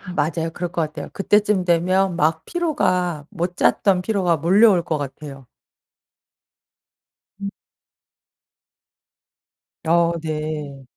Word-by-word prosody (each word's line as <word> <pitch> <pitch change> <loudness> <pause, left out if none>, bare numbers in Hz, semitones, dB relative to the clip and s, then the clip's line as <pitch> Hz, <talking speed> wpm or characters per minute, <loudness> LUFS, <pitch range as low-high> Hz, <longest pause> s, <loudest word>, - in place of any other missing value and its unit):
맞아요. 165 +2 -1
그럴 175 0 -5
것 170 - -1
같아요. 155 -1 -5
그때쯤 205 -1 +2
되면 180 +2 +2
막 160 +1 +1
피로가 185 - -1
못 180 -2 -3
잤던 190 -3 +2
피로가 180 -5 +1
몰려올 185 +3 +4
것 155 - -2
같아요. 140 -1 -8 2.0
음. 200 - -3 2.4
어 170 0 +3
네. 150 -3 -5
170 Hz, 185 characters per minute, -21 LUFS, 155-190 Hz, 2.4 s, 몰려올